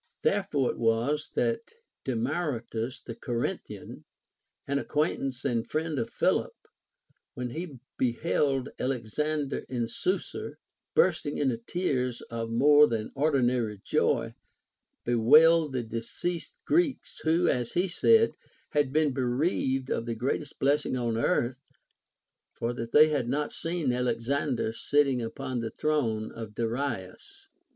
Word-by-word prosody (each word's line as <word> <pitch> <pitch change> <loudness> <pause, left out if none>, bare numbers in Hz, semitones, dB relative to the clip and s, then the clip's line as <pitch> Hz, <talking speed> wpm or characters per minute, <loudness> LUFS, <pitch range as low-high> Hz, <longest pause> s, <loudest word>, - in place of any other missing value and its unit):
7. - - +4
Therefore 150 -10 0
it - - -10
was 120 +7 +1
that 120 - -1 0.3
Demaratus 125 -2 -2
the 115 - -6
Corinthian, 120 0 -4 0.6
an 140 0 +1
acquaintance 140 -4 -1
and 120 -4 0
friend 155 -2 -1
of 115 - -2
Philip, - - +1 0.8
when 125 -1 -4
he 160 -1 -6 0.2
beheld 135 +1 +1
Alex 125 -2 -3
ander 150 -2 0
in 120 -3 -1
Susa, 365 - -2 0.4
bursting 150 - +2
into 130 -5 +1
tears 125 -3 -1
of 115 -1 -3
more 145 +5 +6
than 110 -2 -3
ordinary 125 -7 +1
joy, - - +1 0.7
bewailed 150 +6 +5
the 125 -2 -1
deceased 115 +10 -4
Greeks, 320 -4 +1
who, 165 +2 +2
as 120 -2 0
he 180 +2 +2
said, 450 - +4 0.4
had 145 -3 +2
been 150 -1 +2
bereaved 130 0 0
of 115 - -1
the 115 - -2
greatest 135 +5 -2
blessing 140 -1 +1
on 120 -2 -1
earth, 120 +2 0 0.9
for 115 +1 -2
that 115 -1 -5
they 155 +1 +7
had 135 -6 0
not 145 +3 -1
seen 165 -6 -1
Alexander 125 0 0
sitting 135 0 +2
upon 120 +2 -4
the 115 -1 -3
throne 115 -6 -1
of 110 -2 -8
Darius. 125 - -4
130 Hz, 130 wpm, -28 LUFS, 115-150 Hz, 0.9 s, they